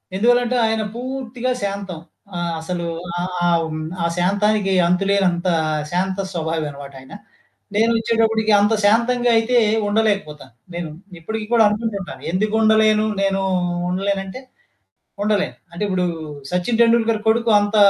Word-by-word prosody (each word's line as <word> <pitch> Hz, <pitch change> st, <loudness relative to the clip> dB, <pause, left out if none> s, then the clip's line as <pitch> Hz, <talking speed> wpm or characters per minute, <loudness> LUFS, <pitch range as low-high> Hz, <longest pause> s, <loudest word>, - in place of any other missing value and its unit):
ఎందువల్లంటే 245 Hz, +3 st, +2 dB
ఆయన 220 Hz, 0 st, 0 dB
పూర్తిగా 255 Hz, 0 st, -4 dB
శాంతం. 195 Hz, -4 st, -4 dB, 0.4 s
ఆహ్, 170 Hz, -1 st, -2 dB
అసలు 170 Hz, +1 st, -4 dB, 0.3 s
ఆహ్, 180 Hz, +1 st, -3 dB, 0.2 s
ఆహ్, 165 Hz, -2 st, 0 dB, 0.3 s
ఆ -, -, +1 dB
శాంతానికి 200 Hz, +2 st, +1 dB
అంతులేనంత 185 Hz, -1 st, +1 dB, 0.4 s
శాంత 185 Hz, +2 st, -1 dB, 0.2 s
స్వభావి 160 Hz, -1 st, -2 dB
అనమాటాయన. 140 Hz, 0 st, -11 dB, 0.6 s
నేనొచ్చేటప్పటికి 225 Hz, 0 st, +2 dB
అంత 210 Hz, +2 st, +3 dB
శాంతంగా 240 Hz, +3 st, +3 dB
అయితే 240 Hz, +2 st, +2 dB, 0.3 s
ఉండలేకపోతాను. 200 Hz, -, -1 dB, 0.2 s
నేను 170 Hz, -2 st, -4 dB, 0.3 s
ఇప్పటికి 220 Hz, +5 st, -5 dB
కూడా 225 Hz, -2 st, +6 dB
అనుకుంటుంటాను. 205 Hz, -, -3 dB
ఎందుకు 215 Hz, +4 st, 0 dB
ఉండలేను 215 Hz, 0 st, +4 dB, 0.2 s
నేను 195 Hz, 0 st, +1 dB, 0.5 s
ఉండలేనంటే 195 Hz, +5 st, -2 dB, 0.8 s
ఉండలేను. 205 Hz, -2 st, 0 dB, 0.2 s
అంటే 175 Hz, +4 st, -6 dB
ఇప్పుడు 185 Hz, -1 st, 0 dB, 0.5 s
సచిన్ 225 Hz, +6 st, 0 dB
టెండూల్కర్ 230 Hz, -1 st, +3 dB
కొడుకు 230 Hz, +1 st, +2 dB
అంత 205 Hz, +1 st, -1 dB
205 Hz, 115 wpm, -20 LUFS, 180-225 Hz, 0.8 s, కూడా